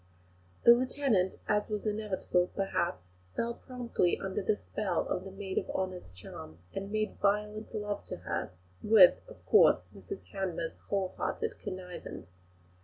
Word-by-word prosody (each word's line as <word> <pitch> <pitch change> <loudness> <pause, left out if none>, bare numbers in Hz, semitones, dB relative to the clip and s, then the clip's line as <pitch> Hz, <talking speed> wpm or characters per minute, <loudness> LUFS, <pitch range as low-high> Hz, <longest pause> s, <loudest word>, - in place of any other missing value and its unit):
The 235 - +10
lieutenant, 245 -6 +2
as 210 +1 +1
was 210 0 -3
inevitable, 205 -4 0
perhaps, 170 - -1 0.2
fell 235 +1 0
promptly 240 -8 -1
under 195 +1 -2
the 205 +2 +2
spell 200 -4 -2
of 180 - -2
the 195 - -7
maid 195 -1 -2
of - - -7
honour's 185 - -3
charms, 90 -3 -10 0.2
and 195 +1 -4
made 215 -1 -1
violent 210 +1 +1
love 205 -1 -2
to - - -5
her, - - -3 0.3
with, 210 -4 +7
of - - -14
course, - - +5
Mrs 400 - -7
Hanmer's 195 +4 -3
whole 195 -2 0
hearted - - -1
connivance. 180 - -7
200 Hz, 145 wpm, -31 LUFS, 185-215 Hz, 0.3 s, The